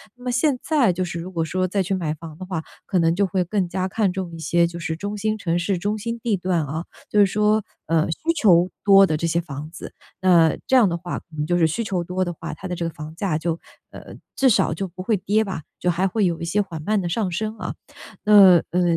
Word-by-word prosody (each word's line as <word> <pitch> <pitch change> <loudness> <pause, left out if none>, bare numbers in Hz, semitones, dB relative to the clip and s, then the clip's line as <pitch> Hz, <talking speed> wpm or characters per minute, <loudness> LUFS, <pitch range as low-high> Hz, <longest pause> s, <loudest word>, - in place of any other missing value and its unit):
那 245 - -17
么 250 - -1
现 255 +1 +1
在 270 - +2
就 185 +2 -2
是 170 -1 -4
如 180 +3 -7
果 165 -3 -1
说 185 +3 -1
再 195 +2 0
去 190 +1 -1
买 165 -5 -2
房 160 0 -10
的 185 - -7
话， 180 -4 -3 0.2
可 185 - 0
能 165 0 +2
就 200 +2 +2
会 185 0 0
更 190 +1 -1
加 185 +1 -2
看 195 -1 0
重 185 -2 -4
一 165 - -8
些， 170 +1 +2
就 170 0 -8
是 165 -1 -3
中 200 +5 -5
心 215 +1 0
城 175 -5 -1
市、 180 +3 0
中 205 +4 -1
心 230 +2 -4
地 225 -3 0
段 180 -2 0
啊。 155 +4 -4 0.2
就 210 - +2
是 205 - +7
说， 210 +2 +2 0.2
嗯， 160 0 +2
需 - - -5 0.2
求 180 -6 +5
多 195 -1 +7
的 155 - 0
这 170 - -2
些 165 +1 +1
房 150 -2 -8
子。 170 - -9 0.3
那 170 -4 +5
这 265 - +3
样 245 -5 +6
的 170 - -1
话 175 +1 -5
可 - - -11
能 150 0 -2
就 175 +1 +2
是 170 - +4
需 165 +9 -1
求 190 -5 -2
多 180 +2 -2
的 175 - -2
话， 165 -1 -7
它 190 - -7
的 180 - -3
这 170 - -3
个 165 - -6
房 150 +1 -9
价 170 -4 -1
就， 165 0 -2 0.3
呃， - - -11 0.2
至 265 -1 +4
少 - - +2
就 180 +4 -3
不 185 +1 -9
会 210 +3 +1
跌 205 +3 +1
吧， 190 -7 -5 0.2
就 180 - 0
还 180 +2 +1
会 205 +2 +1
有 170 -2 -2
一 - - -4
些 195 +5 +1
缓 175 -5 -6
慢 210 +3 +1
的 175 - -3
上 190 +1 -1
升 215 +5 -3
啊。 - - -4 0.5
呃， 195 -5 +8
呃， 180 +2 +1
180 Hz, 290 characters per minute, -22 LUFS, 170-205 Hz, 0.5 s, 呃